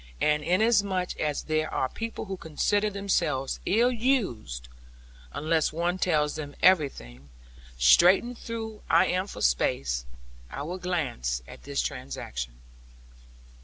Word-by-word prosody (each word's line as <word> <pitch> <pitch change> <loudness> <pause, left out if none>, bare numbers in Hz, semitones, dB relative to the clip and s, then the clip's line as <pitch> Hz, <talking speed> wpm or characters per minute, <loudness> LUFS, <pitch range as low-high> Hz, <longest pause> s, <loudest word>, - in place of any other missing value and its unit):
And 150 0 +2
inasmuch 195 -1 +2
as 150 -1 -1
there 155 0 -1
are 130 - 0
people 225 +10 -5
who 195 -1 -4
consider 205 +6 0
themselves 185 -9 -1
ill 235 +6 +4
used, 185 - -1 0.6
unless 160 +1 +1
one 175 +3 -1
tells 150 -5 +1
them 145 -2 -6
everything, 100 - +2 0.5
straitened 180 - +5
though 225 -2 -5
I 165 - +5
am 185 +2 0
for - - -8
space, - - +1 0.4
I 140 - -5
will 180 +5 -5
glance 125 - -2
at - - -12
this 140 0 -1
transaction. 60 - -5
160 Hz, 125 wpm, -27 LUFS, 130-195 Hz, 0.6 s, straitened